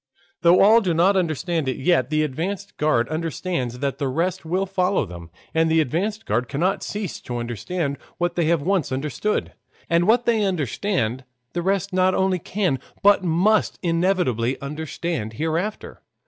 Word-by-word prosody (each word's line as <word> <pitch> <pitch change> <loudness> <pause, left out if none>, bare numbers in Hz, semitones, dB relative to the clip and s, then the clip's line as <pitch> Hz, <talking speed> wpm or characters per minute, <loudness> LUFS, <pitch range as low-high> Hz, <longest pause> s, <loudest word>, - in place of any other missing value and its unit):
Though 170 +1 +6
all 220 +4 +7
do 180 -5 0
not 185 +4 +4
understand 165 -3 0
it 130 - -1
yet, 145 -3 +2
the 155 0 +2
advanced 180 +8 -4
guard 150 -6 +2
understand 160 -5 -2
and 140 -1 +1
the 140 - 0
rest 165 +7 -1
will 180 +4 0
follow 190 0 +1
them. 85 -1 -10 0.2
And 160 0 +3
the 160 0 +3
advanced 195 - -1
guard 115 +2 -1
cannot 175 +10 0
cease 205 -4 -4
to 120 - -5
understand 140 - -3 0.2
what 175 0 0
they 170 - +1
have 165 -2 +2
once 185 -4 0
understood; 145 - -2 0.4
and 170 +2 +3
what 235 +2 +4
they 225 -3 +2
understand 145 - -1 0.3
the 175 - -1
rest 195 +1 0
not 185 0 +3
only 190 -1 +1
can 180 -7 -1 0.2
but 200 -1 +5
must 185 +6 +2
inevitably 165 - +1
understand 150 -4 -4
hereafter. 165 - -3
170 Hz, 160 wpm, -23 LUFS, 140-190 Hz, 0.4 s, all